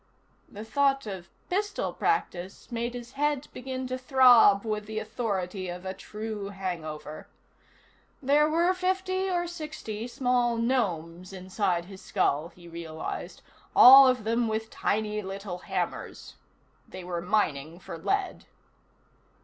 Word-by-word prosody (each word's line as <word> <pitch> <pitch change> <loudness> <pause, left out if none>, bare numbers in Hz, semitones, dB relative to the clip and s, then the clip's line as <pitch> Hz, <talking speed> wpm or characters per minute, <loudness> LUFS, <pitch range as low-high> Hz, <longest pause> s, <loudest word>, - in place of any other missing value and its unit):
The 210 +2 -9
thought 275 +3 +1
of 190 -4 -7 0.2
pistol 410 +2 -1
practice 195 - -2
made 235 +1 -3
his 240 0 -8
head 290 0 -1
begin 260 +1 -5
to 255 0 -4
throb 245 -6 +6
with 210 -1 -3
the 220 0 -5
authority 205 -4 -3
of 180 +1 -7
a 190 - -3
true 210 +1 -6
hangover. 160 -6 -6 0.9
There 290 +2 +3
were 340 +3 +3
fifty 375 +1 -1
or 350 -1 0
sixty 305 -10 -6
small 245 -1 +1
gnomes 185 -8 -1
inside 185 -1 -1
his 190 0 -12
skull, 160 -6 0
he 175 0 -16
realized, 165 -1 -6 0.3
all 270 +2 +10
of 255 -3 +2
them 230 +2 +1
with 220 0 -3
tiny 210 0 -1
little 195 -2 -6
hammers. - - -4 0.6
They 185 - -8
were 175 -1 -4
mining 165 -5 0
for 175 - -8
lead. 395 - -2
220 Hz, 130 wpm, -28 LUFS, 185-260 Hz, 0.9 s, all